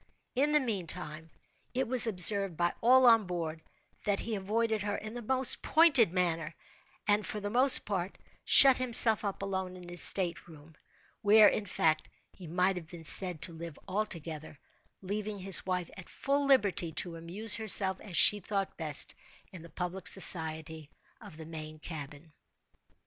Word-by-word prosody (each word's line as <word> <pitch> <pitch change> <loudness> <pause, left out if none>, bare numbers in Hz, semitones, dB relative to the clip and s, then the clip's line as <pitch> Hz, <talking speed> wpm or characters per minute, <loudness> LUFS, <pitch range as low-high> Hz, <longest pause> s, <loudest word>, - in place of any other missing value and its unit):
In 280 +4 -1
the 300 - +2
meantime, 165 - -7 0.5
it 260 0 -2
was 245 -1 +6
observed 195 -3 +5
by 175 0 -2
all 255 +2 +3
on 225 -4 +3
board, 165 -3 -6 0.4
that 200 -1 -2
he 230 - -6
avoided 215 +2 -3
her 205 0 -4
in 215 +1 -10
the 240 - -8
most 260 +3 +1
pointed 285 - +3
manner, 170 -3 -4 0.5
and, 210 0 0
for 210 - -7
the 205 0 -7
most 255 +3 +4
part, 190 -2 -6 0.3
shut 270 -2 +6
himself 235 -3 +3
up 200 -1 -6
alone 190 -2 -6
in 180 -1 -14
his 175 0 +1
state 175 -3 +1
room, 160 -1 -17 0.5
where, 210 +1 +4
in 205 - -3
fact, 155 -3 -2 0.2
he 180 - -14
might 180 +3 -2
have 165 -2 -11
been 170 -2 -13
said 180 -1 -1
to 170 - 0
live 165 -2 -11
altogether, 165 -7 -6 0.5
leaving 205 +2 -6
his 190 -1 +5
wife 180 -2 -4
at 185 -3 -12
full 280 +1 -3
liberty 200 -10 0
to 170 +1 -4
amuse 185 +8 0
herself 195 -3 +4
as 185 -5 -6
she 210 - +6
thought 195 0 -6
best, 155 -3 0 0.4
in 185 -4 -12
the 170 - -15
public 180 +4 -7
society 160 -4 0 0.3
of 155 - -14
the 160 - -11
main 155 -1 -10
cabin. 150 -1 -11
190 Hz, 165 wpm, -28 LUFS, 165-215 Hz, 0.5 s, was